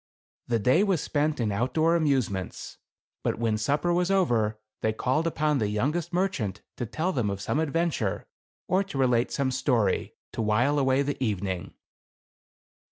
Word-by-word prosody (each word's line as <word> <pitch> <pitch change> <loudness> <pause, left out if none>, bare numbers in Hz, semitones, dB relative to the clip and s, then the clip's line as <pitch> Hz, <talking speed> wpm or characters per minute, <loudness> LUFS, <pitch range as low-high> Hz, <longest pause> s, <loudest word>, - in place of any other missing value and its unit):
The 120 - +2
day 125 - +3
was 195 -5 +2
spent 150 0 0
in 110 -3 0
outdoor 130 +10 +2
amusements; 130 - -1 0.4
but - - -1
when 115 -1 +1
supper 145 +9 +1
was 180 +1 +1
over 115 - +2 0.2
they 110 - +1
called 130 +8 0
upon 150 -3 +1
the 105 -3 0
youngest 150 - -1
merchant 175 - -1
to 120 - -3
tell 160 - -1
them 120 - 0
of 100 -1 -3
some 120 +8 -1
adven 165 +2 0
ture, 100 -4 -2 0.4
or 185 +2 +2
to 190 -8 -7
relate 125 -3 +2
some 135 -2 0
story, 125 -6 +1 0.2
to - - -3
while 120 +7 +2
away 135 0 +3
the 140 -1 -2
evening. 95 -5 -2
130 Hz, 165 wpm, -27 LUFS, 110-160 Hz, 0.4 s, day